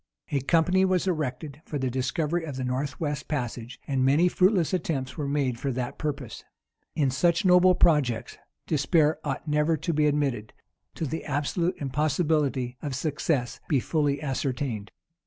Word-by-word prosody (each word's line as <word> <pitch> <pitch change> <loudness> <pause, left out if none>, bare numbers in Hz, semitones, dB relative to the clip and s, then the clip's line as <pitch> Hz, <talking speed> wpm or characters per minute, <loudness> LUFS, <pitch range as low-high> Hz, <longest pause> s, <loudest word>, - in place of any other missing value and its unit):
A 140 - +2
company 170 +6 +3
was 185 -1 +2
erected 155 -3 -3
for 150 - -4
the 130 -2 -1
discovery 150 +6 -1
of 150 -4 -5
the 130 - -3
north 130 +2 -2
west 145 -3 -3
passage; 125 -3 -4
and 135 -2 +1
many 145 +7 +4
fruitless 185 -1 +2
attempts 140 -7 -2
were 145 -3 -3
made 140 -4 0
for 140 - -1
that 125 0 -4
purpose. 140 -7 -4 0.5
In 140 -4 +2
such 165 +7 +2
noble 180 0 +6
projects, 145 -10 +2 0.3
despair 155 +1 +2
ought 145 +2 -4
never 150 +2 +2
to 170 +3 -2
be 150 0 +3
admitted, 140 -7 -1 0.4
till 160 - -2
the 160 +3 -4
absolute 160 +5 -1
impossibility 145 -2 0
of 145 -3 -3
success 135 -3 -1
be 140 - +3
fully 145 +1 0
ascertained. 130 -6 -2
145 Hz, 155 wpm, -27 LUFS, 130-160 Hz, 0.5 s, noble